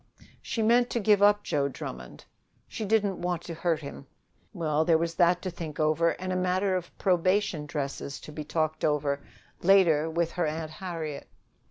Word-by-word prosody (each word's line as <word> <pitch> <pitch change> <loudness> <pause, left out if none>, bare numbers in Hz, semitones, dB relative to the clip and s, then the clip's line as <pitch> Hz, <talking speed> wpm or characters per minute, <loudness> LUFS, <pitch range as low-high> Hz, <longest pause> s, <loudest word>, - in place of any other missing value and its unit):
She 225 - -2
meant 240 +2 +4
to 235 - -1
give 210 -2 +4
up 205 0 +5
Joe 140 -1 0
Drummond. 65 - -8 0.4
She 220 - -5
didn't 200 -3 +1
want 175 -1 -2
to 170 - -6
hurt 165 0 -1
him. 140 -1 -9 0.4
Well, 155 -4 0
there 160 0 +4
was 165 +1 -2
that 175 +1 +3
to 185 - -3
think 165 -3 -7
over 155 +2 +2
and 185 0 -3
a - - -1
matter 185 +1 +1
of 180 -2 -5
probation 185 -3 +1
dresses 140 -1 -4
to - - -10
be 150 0 -6
talked 155 +1 -2
over 145 -2 +1 0.4
later 170 -5 +4
with 170 +1 0
her 175 -3 -1
Aunt 155 +1 -4
Harriet. 160 -4 -6
170 Hz, 180 wpm, -28 LUFS, 155-185 Hz, 0.4 s, up